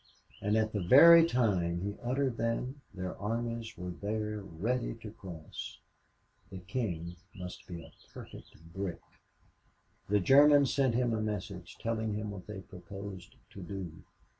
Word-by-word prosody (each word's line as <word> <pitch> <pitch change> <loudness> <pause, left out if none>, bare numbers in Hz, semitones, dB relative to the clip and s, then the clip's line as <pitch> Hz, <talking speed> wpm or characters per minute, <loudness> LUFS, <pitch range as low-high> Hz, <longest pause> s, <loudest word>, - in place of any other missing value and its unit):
and 105 +2 +2
at 110 0 +1
the 105 - 0
very 165 - +9
time 100 - +1
he 100 +2 -3
uttered 130 0 0
them 125 +4 -2
their 90 -1 -4
armies 115 +1 -3
were 90 0 -5
there 105 +3 -3
ready 110 +8 -2
to 110 -2 -9
cross. 90 -8 -8 0.7
The 95 - -7
King 90 -4 -3 0.2
must 90 -1 -8
be 85 -2 -7
a - - -14 0.2
perfect 80 +1 -12
brick. 95 -3 -3 1.1
The 105 0 +4
Germans 140 +5 +6
sent 130 -4 +2
him 120 -1 +2
a 110 - 0
message, 100 -4 -4
telling 110 -2 -1
him 105 0 -3
what 95 -3 -9
they 105 -2 -6
proposed 95 0 -9 0.2
to 100 - -9
do. 90 -3 -6
105 Hz, 145 wpm, -32 LUFS, 90-115 Hz, 1.1 s, very